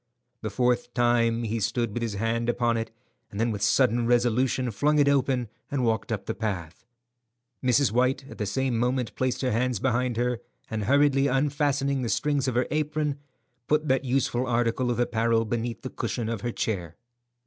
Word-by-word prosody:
The 110 Hz, -, -3 dB
fourth 125 Hz, +2 st, 0 dB
time 120 Hz, -1 st, +2 dB
he 115 Hz, 0 st, -2 dB
stood 115 Hz, +1 st, -1 dB
with 120 Hz, -, -3 dB
his 115 Hz, -3 st, -2 dB
hand 115 Hz, +3 st, -1 dB
upon 120 Hz, -1 st, +1 dB
it, 115 Hz, 0 st, -2 dB, 0.4 s
and 100 Hz, -, -7 dB
then 115 Hz, +1 st, +1 dB
with 100 Hz, -2 st, -4 dB
sudden 120 Hz, +2 st, +3 dB
resolution 120 Hz, +1 st, +2 dB
flung 150 Hz, +9 st, +2 dB
it 145 Hz, -1 st, +4 dB
open 130 Hz, -3 st, +2 dB, 0.2 s
and 135 Hz, -3 st, 0 dB
walked 115 Hz, +1 st, 0 dB
up 105 Hz, -3 st, -2 dB
the -, -, -2 dB
path. 95 Hz, -4 st, -4 dB, 0.8 s
Mrs. 125 Hz, -1 st, +3 dB
White 130 Hz, +3 st, +1 dB
at -, -, -11 dB
the 105 Hz, -, -1 dB
same 130 Hz, +2 st, 0 dB
moment 125 Hz, 0 st, 0 dB
placed 130 Hz, -1 st, -1 dB
her 130 Hz, -2 st, 0 dB
hands 125 Hz, +1 st, +1 dB
behind 125 Hz, -1 st, 0 dB
her, 120 Hz, 0 st, 0 dB, 0.3 s
and 110 Hz, -2 st, -2 dB
hurriedly 140 Hz, +1 st, +4 dB
unfastening 140 Hz, 0 st, +1 dB
the 120 Hz, -, -2 dB
strings 145 Hz, -1 st, 0 dB
of 130 Hz, -, -1 dB
her 125 Hz, +1 st, +2 dB
apron, 150 Hz, -1 st, -1 dB, 0.5 s
put 150 Hz, 0 st, +1 dB
that 130 Hz, 0 st, +2 dB
useful 130 Hz, -1 st, 0 dB
article 120 Hz, +1 st, +1 dB
of 120 Hz, -1 st, -1 dB
apparel 115 Hz, -1 st, +1 dB
beneath 115 Hz, +1 st, -3 dB
the 130 Hz, -, -5 dB
cushion 115 Hz, -3 st, -3 dB
of 115 Hz, -3 st, -3 dB
her 120 Hz, -, -2 dB
chair. 90 Hz, -9 st, -3 dB
120 Hz, 185 wpm, -26 LUFS, 115-130 Hz, 0.8 s, it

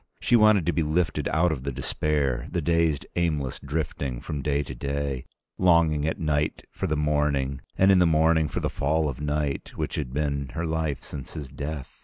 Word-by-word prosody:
She 120 Hz, -, +3 dB
wanted 110 Hz, -6 st, +5 dB
to 85 Hz, -, +2 dB
be 85 Hz, -, +1 dB
lifted 80 Hz, -1 st, 0 dB
out 80 Hz, +2 st, +2 dB
of 70 Hz, -5 st, -3 dB
the 70 Hz, +1 st, -3 dB
despair, 70 Hz, -1 st, -1 dB
the -, -, -1 dB
dazed 85 Hz, -2 st, +1 dB
aimless 75 Hz, -6 st, 0 dB
drifting 70 Hz, -3 st, -3 dB
from 75 Hz, +2 st, -4 dB
day 70 Hz, +1 st, 0 dB
to 65 Hz, -, -7 dB
day, 70 Hz, 0 st, -3 dB, 0.3 s
longing 85 Hz, -4 st, +4 dB
at 80 Hz, -, -1 dB
night 75 Hz, -1 st, 0 dB
for -, -, -3 dB
the 75 Hz, -, 0 dB
morning, 75 Hz, -2 st, 0 dB, 0.2 s
and 95 Hz, +1 st, +6 dB
in 95 Hz, -, +6 dB
the 90 Hz, -, +5 dB
morning 80 Hz, 0 st, +3 dB
for 70 Hz, -, -3 dB
the -, -, 0 dB
fall 75 Hz, +2 st, +1 dB
of 70 Hz, -1 st, -5 dB
night, 75 Hz, -1 st, -2 dB
which -, -, -3 dB
had 70 Hz, -5 st, -3 dB
been 70 Hz, -1 st, -1 dB
her 85 Hz, +1 st, -1 dB
life 80 Hz, -4 st, -2 dB
since 70 Hz, -4 st, -7 dB
his 70 Hz, -4 st, -6 dB
death. 70 Hz, 0 st, -6 dB
75 Hz, 200 wpm, -26 LUFS, 70-80 Hz, 0.3 s, and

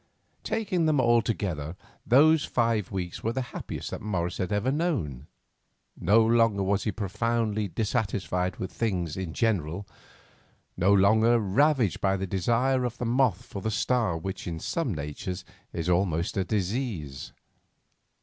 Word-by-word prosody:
Taking 185 Hz, -7 st, 0 dB
them 150 Hz, -3 st, +3 dB
all 120 Hz, -2 st, +4 dB
together, 90 Hz, -8 st, -3 dB, 0.3 s
those 155 Hz, +5 st, +6 dB
five 115 Hz, -5 st, 0 dB
weeks 90 Hz, -3 st, -5 dB
were 115 Hz, -, 0 dB
the 130 Hz, +1 st, -1 dB
happiest -, -, -5 dB
that -, -, -5 dB
Morris 95 Hz, -4 st, -2 dB
had 95 Hz, +2 st, -2 dB
ever 105 Hz, +6 st, +1 dB
known. 115 Hz, -, -2 dB, 0.7 s
No 110 Hz, +5 st, +4 dB
longer 115 Hz, -3 st, +3 dB
was 100 Hz, +1 st, 0 dB
he 105 Hz, -, +1 dB
profoundly 105 Hz, +2 st, -1 dB
dissatisfied 100 Hz, -3 st, -1 dB
with 95 Hz, -, -5 dB
things 90 Hz, -9 st, -2 dB
in 95 Hz, -4 st, -4 dB
general, 100 Hz, -4 st, 0 dB, 0.9 s
no 95 Hz, +3 st, +3 dB
longer 110 Hz, +4 st, +5 dB
ravaged 115 Hz, -, +2 dB
by 95 Hz, 0 st, +2 dB
that 95 Hz, -1 st, -5 dB
desire 120 Hz, +7 st, +1 dB
of 120 Hz, -1 st, -3 dB
the 125 Hz, -, -3 dB
moth 120 Hz, -5 st, +2 dB
for 100 Hz, -, -7 dB
the 110 Hz, -, -1 dB
star 110 Hz, -4 st, +1 dB
which 95 Hz, +3 st, -5 dB
in 85 Hz, -2 st, -4 dB
some 160 Hz, -, -2 dB
natures 80 Hz, +5 st, -5 dB, 0.3 s
is 85 Hz, 0 st, -4 dB
almost 90 Hz, -2 st, +1 dB
a 95 Hz, -, +1 dB
disease. 95 Hz, -, -3 dB
105 Hz, 150 wpm, -27 LUFS, 90-120 Hz, 0.9 s, those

